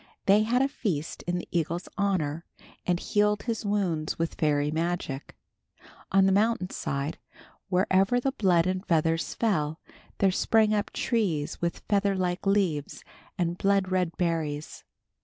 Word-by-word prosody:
They 200 +2 +5
had 245 +4 +2
a - - +3
feast 175 - -3
in 175 0 0
the 175 - -6
eagle's 170 +1 -1
honor, 170 -6 0 0.4
and 175 -1 +2
healed 210 +1 +1
his 230 -2 -2
wounds 185 -7 -1
with 165 0 -1
fairy 150 -1 +1
magic. 160 -4 -3 0.8
On 195 0 +5
the 195 - +4
mountain 205 -1 +1
side, 140 +3 -3 0.5
wherever 190 +5 +3
the 270 +2 0
blood 180 -8 +3
and 185 0 -1
feathers 165 -2 +1
fell, 160 -9 0 0.4
there 195 -1 +3
sprang 215 +3 +3
up 205 -1 -1
trees 180 -11 -1
with 170 0 -3
featherlike 195 -3 0
leaves 185 -8 0 0.3
and 175 0 -1
blood 195 -1 +2
red 180 -3 0
berries. 160 -4 -2
185 Hz, 140 wpm, -27 LUFS, 165-200 Hz, 0.8 s, They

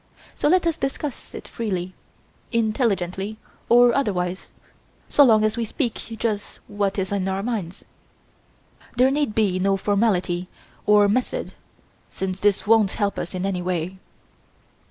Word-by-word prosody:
So - - 0
let 355 +3 +3
us 335 -1 0
discuss 270 0 -4
it - - -8
freely 185 -5 -3 0.6
intelligently 215 -4 0 0.3
or 240 0 +6
otherwise, 185 -8 -1 0.6
so 290 - +6
long 220 -5 +5
as 215 +2 +1
we 235 - 0
speak 235 +2 -1
just 220 -2 -4
what 205 -1 -1
is 190 -1 -2
in 195 -2 -1
our 190 +1 -2
minds. 205 -6 -4 1.1
There 255 +2 +5
need 285 -6 0
be 200 -4 +2
no 195 +1 +2
formality 190 -4 0 0.4
or 205 -1 +6
method 255 - -1 0.6
since 190 0 -4
this 205 0 +2
won't 215 -2 +4
help 205 -2 -1
us 175 - -5
in 185 +1 -2
any 190 -2 -1
way." 180 +1 -3
205 Hz, 140 wpm, -23 LUFS, 190-230 Hz, 1.1 s, or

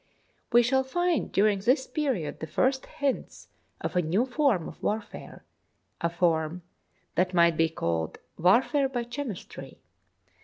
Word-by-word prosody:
We 240 0 +6
shall 265 +2 +2
find 350 +4 0
during 205 0 +3
this 255 +6 +2
period 255 - -2
the 160 - -5
first 260 - 0
hints 285 -4 -3 0.3
of - - -4
a 180 - +4
new 180 +9 +1
form 250 - +1
of - - -11
warfare, 215 0 -4 0.6
a 170 - +1
form 170 0 0 0.5
that 180 0 +1
might 170 -1 +5
be 165 0 +2
called 80 - -2
" - - -45
warfare 270 +6 +3
by 245 -2 -2
chemistry." 240 -4 -7
215 Hz, 145 wpm, -27 LUFS, 170-265 Hz, 0.6 s, We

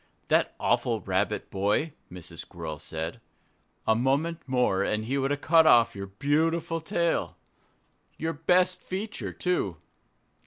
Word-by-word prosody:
"That - - +2
awful - - +1
Rabbit - - -1
boy!" 105 +11 0 0.2
Mrs. 90 -2 -8
Squirrel 80 -3 -7
said. 80 +10 -5 0.6
"A 110 - +4
moment 140 +8 +1
more 125 -7 +2
and 105 +2 0
he 130 +4 -1
would 135 0 0
have 145 0 -1
cut 160 -1 +5
off 115 -5 +6
your 100 0 -5
beautiful 160 +9 0
tail 170 +1 0 0.8
your 160 +2 -2
best 180 +4 +2
feature, 205 +3 -4
too!" 140 - -1
140 Hz, 130 wpm, -27 LUFS, 100-165 Hz, 0.8 s, off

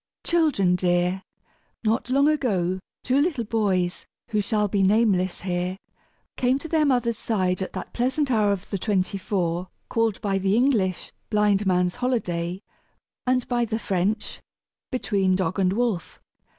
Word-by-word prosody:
_ - - -9
Children 295 - +3
Dear: 180 +1 +1 0.6
Not 225 +2 0
long 280 +3 +4
ago 195 - +1 0.2
two 260 +3 +2
little 295 -7 0
boys, 195 -5 0 0.2
who 210 -2 +1
shall 210 0 0
be 200 0 0
nameless 195 -2 +2
here, 180 0 -2 0.6
came 255 +1 +2
to 305 - -7
their 315 -2 +2
mother's 240 -4 +1
side 185 -4 0
at 190 - -4
that - - -6
pleasant 260 +3 0
hour 210 -3 +3
of 200 -1 -4
the 195 - -1
twenty 195 -1 0
four 180 -2 -1 0.2
called 225 -3 +1
by 195 -2 0
the 195 +1 +1
English 225 -8 +1 0.2
"blind 210 -2 +2
man's 180 +2 +1
holiday," 185 -9 -1 0.7
and 255 -1 +1
by 240 -1 +1
the 220 -1 -1
French, 200 +1 -1 0.5
"between 200 -7 +1
dog 185 0 -1
and 185 -1 +3
wolf." 215 -5 -1
205 Hz, 150 wpm, -24 LUFS, 185-240 Hz, 0.7 s, long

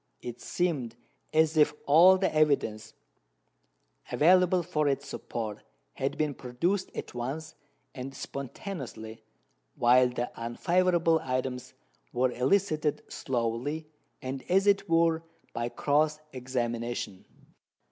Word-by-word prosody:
It 120 -1 -7
seemed 145 -10 -1 0.4
as 160 0 +3
if 150 -1 +4
all 175 +6 +7
the 190 - 0
evidence 140 -8 +1 1.2
available 180 +2 +4
for 155 -4 0
its 140 0 -1
support 110 -6 -5 0.3
had 135 +1 -2
been 150 -2 0
produced 170 +11 -1
at - - -6
once 135 +6 -4 0.4
and 135 +1 -7
spontaneously, 125 - -7 0.5
while 125 +1 +5
the 125 0 -3
unfavourable 170 +7 +2
items 130 -1 -3 0.4
were 125 0 +2
elicited 155 +3 +1
slowly, 125 +5 -2 0.4
and, 130 +1 -4
as 190 +2 +4
it 200 -2 +3
were, 165 -1 +3 0.3
by 120 +1 -2
cross 150 +4 +1
examination. 120 -5 -3
140 Hz, 105 wpm, -29 LUFS, 125-165 Hz, 1.2 s, all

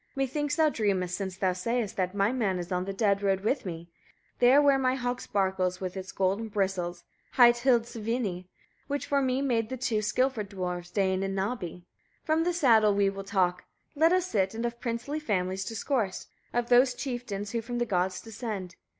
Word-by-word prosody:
methinks 290 +2 -1
thou 315 -1 +4
dreamest, 195 -9 0
since 190 -1 -4
thou 190 -2 +1
sayest 230 +3 -2
that 185 0 -1
my 200 +2 +2
man 215 -8 0
is 175 0 -6
on 180 0 0
the 195 - -3
dead 200 0 +1
road 195 -1 +1
with 240 +2 -1
me; 170 -1 -6 0.5
there 250 +3 +6
where 280 -2 +4
my 255 -1 +2
hog 245 -1 -2
sparkles 190 -2 0
with 185 -1 -4
its 190 0 -6
golden 195 +4 0
bristles, 190 -4 -2 0.3
hight 240 -2 +7
Hildisvini, 230 -6 0 0.4
which 285 0 -2
for 280 -1 +1
me 260 +1 0
made 230 -5 0
the 260 - -4
two 225 -3 0
skilful 235 +2 0
dwarfs, 180 -3 -5
Dain 190 0 +1
and 195 0 -2
Nabbi. 190 -4 -3 0.4
From 315 +1 +2
the 355 - +2
saddle 225 - +4
we 200 -1 +3
will 195 0 -7
talk: 180 -3 0 0.3
let 320 +3 +4
us 365 -1 +3
sit, 195 - 0
and 230 +1 -2
of 235 0 -4
princely 240 +5 -3
families 190 -8 -1
discourse, 225 -3 -2 0.3
of 240 0 -1
those 250 +1 +5
chieftains 235 -7 -4
who 230 - -1
from 240 +2 -5
the 240 - +1
gods 185 -3 0
descend. 210 -5 -6
215 Hz, 190 wpm, -28 LUFS, 190-250 Hz, 0.5 s, hight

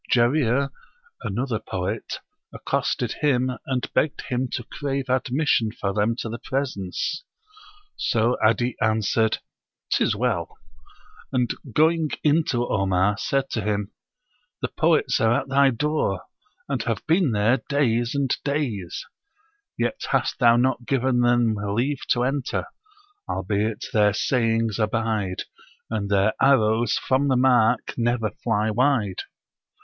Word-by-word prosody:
Jarir 130 +2 +2 0.5
[another 115 +2 -2
poet] 95 -3 -4 0.3
accosted - - -1
him, 130 -4 +2 0.2
and 130 -2 -2
begged 150 - +1
him 125 +1 -2
to 120 - -2
crave 135 +1 -4
admission 130 -3 +1
for 100 -2 -3
them 110 +3 +1
to - - -4
the 115 +2 -5
presence; 130 - -3 0.7
so 115 +2 +1
'Adi 115 +2 +2
answered, 110 0 +2 0.5
"'Tis - - +2
well," - - -2 0.7
and 125 -3 +1 0.2
going 160 +4 +3
in 155 +2 +4
to 120 -2 0
Omar, 95 0 +1
said 135 0 -1
to 110 - -1
him, 105 0 -2 0.7
"The - - 0
poets 155 -6 +2
are 115 +1 +3
at - - -12
thy 140 0 +5
door, 150 +5 -1 0.4
and - - -1
have - - -3
been 165 -3 +3
there 110 +4 +2
days 120 -4 +1
and 140 -3 +1
days; 120 - -2 0.7
yet - - -2
hast - - 0
thou 120 -3 +6
not 125 0 +1
given 130 -2 +1
them 120 -2 +3
leave 110 +7 -2
to 120 -2 +2
enter, 135 0 -1 0.6
albeit 105 +1 -1
their 105 -2 +4
sayings 115 -1 +1
abide, 110 -3 -1 0.5
and 105 -3 -2
their 100 +1 +3
arrows 115 -4 +3
from 135 +2 +1
the 130 -2 +3
mark 125 -2 +3
never 115 -2 0
fly 110 -1 -1
wide." 115 -5 +1
120 Hz, 130 wpm, -24 LUFS, 110-135 Hz, 0.7 s, thou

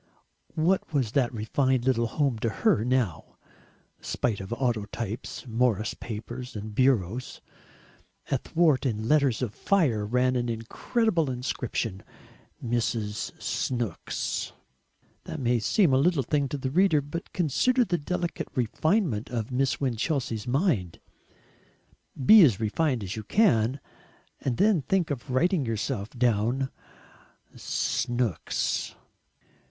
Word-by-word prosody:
What 175 +4 +1
was 125 -6 +1
that 125 -2 +1
refined 125 +3 0
little 120 -3 +2
home 135 -2 0
to 115 - 0
her 110 -1 +2
now, 120 -10 -1 0.6
spite 115 -5 -1
of 95 - -7
autotypes, 115 -2 -3
Morris 115 -3 +1
papers, 120 +3 -7
and 105 +1 -6
bureaus? 125 -2 +1 0.9
Athwart 155 -5 +2
it 115 - 0
in 110 +1 -4
letters 140 -4 +3
of 110 -4 -3
fire 150 - +1
ran 125 +4 +1
an 120 -1 0
incredible 165 - 0
inscription: 125 -5 -3 0.6
"Mrs. 115 -2 -2
Snooks." 120 -4 -2 0.7
That - - -5
may 120 -2 +2
seem 155 - +3
a - - +5
little 155 -1 +2
thing 140 +2 0
to 145 - -3
the 130 -1 -3
reader, 175 -2 +4
but 145 +5 -7
consider 240 - +2
the 175 -4 -1
delicate 175 +3 -3
refinement 130 - 0
of 120 -1 -3
Miss 130 +1 0
Winchelsea's 125 -3 -1
mind. 125 - 0 1.3
Be 215 +6 +9
as 125 - +5
refined 120 +2 0
as 95 0 -4
you 110 - -5
can 130 - +2 0.6
and 125 -3 -2
then 200 -4 +4
think 175 +3 0
of 135 -1 -5
writing 160 +5 +2
yourself 115 -2 -2
down: 120 +2 0 0.8
"Snooks." 120 - -1
125 Hz, 120 wpm, -27 LUFS, 115-145 Hz, 1.3 s, Be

